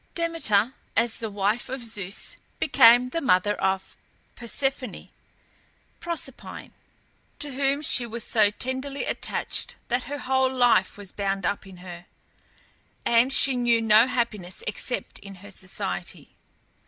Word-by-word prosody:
Demeter, 265 -10 +1 0.2
as 230 0 +1
the 225 - -4
wife 205 +3 -1
of 260 -1 -5
Zeus, 200 -3 -4 0.2
became 245 -3 +6
the 330 +6 -3
mother 205 - +3
of 190 0 -1 0.4
Persephone 255 0 -3 0.9
(Proserpine), 340 -1 -5 0.7
to 290 -2 -1
whom 275 +2 0
she 250 -4 +3
was 230 0 -3
so 215 -3 +3
tenderly 260 +5 -3
attached - - +1
that 245 +1 0
her 290 - -5
whole 265 -1 +1
life 245 -7 +3
was 200 -2 -7
bound 195 -1 -2
up 200 -1 -2
in 190 -1 -12
her, 175 -1 -10 1.0
and 235 +3 +4
she 270 0 +4
knew 240 -1 +3
no 225 +1 +5
happiness 215 -8 -3
except 230 +4 -2
in 200 -1 -11
her 200 +3 -13
society. 95 - -5
235 Hz, 130 wpm, -25 LUFS, 200-260 Hz, 1.0 s, became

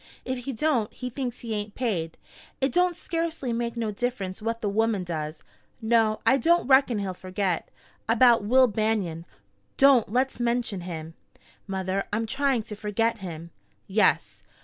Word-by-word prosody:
If 255 -1 -4
he 275 - -3
don't, 250 -4 +1
he 250 0 -6
thinks 250 -1 -4
he 230 -2 -4
ain't 210 0 -4
paid, 180 -10 -2 0.4
it 270 0 +1
don't 360 -1 +2
scarcely 330 -7 -3
make 235 0 -2
no 225 -2 -1
difference 210 -3 -3
what 230 +1 -2
the 215 - -1
woman 215 -1 +1
does. 155 -3 -5 0.4
No, 220 -2 +2
I 265 - +5
don't 340 +7 +3
reckon 265 -3 +4
he'll 195 -2 -2
forget. 185 -1 -2 0.4
About 235 -1 +5
Will 255 +5 +5
Banion 210 -7 -1 0.3
" - - -42
"Don't 250 -7 +4
let's 255 +2 0
mention 235 -5 0
him, 165 -2 -6 0.5
mother. 190 0 -2
I'm 220 +2 0
trying 270 0 0
to 210 -1 -7
forget 220 +2 -1
him." 170 -3 -7 0.3
"Yes? 205 +2 +1
225 Hz, 160 wpm, -26 LUFS, 195-250 Hz, 0.5 s, I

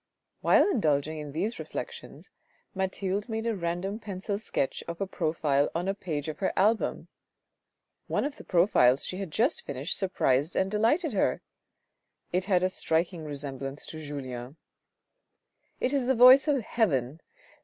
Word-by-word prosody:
While - - +5
indulging 155 - +1
in 150 -1 -6
these 205 +10 -2
reflections - - -7 0.4
Mathilde 190 +2 -2
made 225 0 -3
a 230 -1 0
random 180 +3 -3
pencil 200 -1 -4
sketch 140 -10 -2
of 170 0 -5
a 195 - 0
profile 155 -5 0
on 175 +3 -1
a 195 - +1
page 155 -7 -4
of 155 -1 -5
her 190 - 0
album. 215 +4 +1 1.0
One - - 0
of 290 0 -4
the - - -11
profiles 155 -8 +4
she 185 - -4
had 195 -2 -4
just 240 - +1
finished 140 +4 -3
surprised 155 -5 +1
and 190 +1 +1
delighted 240 - +2
her. 195 - +1 0.9
It 185 +1 +1
had 185 -3 +2
a 185 - +3
striking 170 -1 -1
resemblance 140 -1 -5
to 160 - -8
Julien. 130 -2 -6 0.6
" - - -48
It 260 - 0
is 270 -3 +1
the 265 - +3
voice 255 +4 +8
of 275 -5 +2
heaven. 155 - 0
185 Hz, 155 wpm, -28 LUFS, 150-215 Hz, 1.0 s, voice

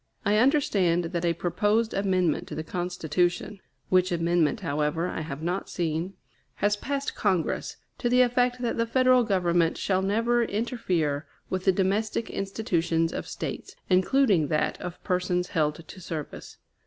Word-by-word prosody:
I 205 +1 +3
understand 200 - +3
that 170 0 -2
a 170 - +2
proposed 210 +6 +1
amendment 185 -5 +1
to - - -6
the 155 - -3
Constitution 175 +3 -1 0.3
(which 185 0 +3
amendment, 170 -2 +1
however, 150 +4 -1
I 165 - -4
have 155 -1 -6
not 180 +3 -2
seen) 170 +2 -2 0.4
has 205 0 +1
passed 280 +5 -3
Congress, 190 -6 -1 0.2
to 240 - 0
the 250 +1 +5
effect 245 0 +1
that 235 - -1
the 230 0 +1
Federal 255 +1 +4
Government 175 -5 +1
shall 190 -1 0
never 230 +5 +2
interfere 185 - -1 0.2
with 185 0 -2
the 190 - +6
domestic 200 +4 0
institutions 170 -5 -1
of - - -4
States, - - -6 0.2
including 190 - +3
that 150 +1 -1
of 180 0 -7
persons 180 -1 0
held 155 0 -1
to 185 - -11
service. 160 -4 -7
185 Hz, 150 wpm, -27 LUFS, 170-220 Hz, 0.4 s, the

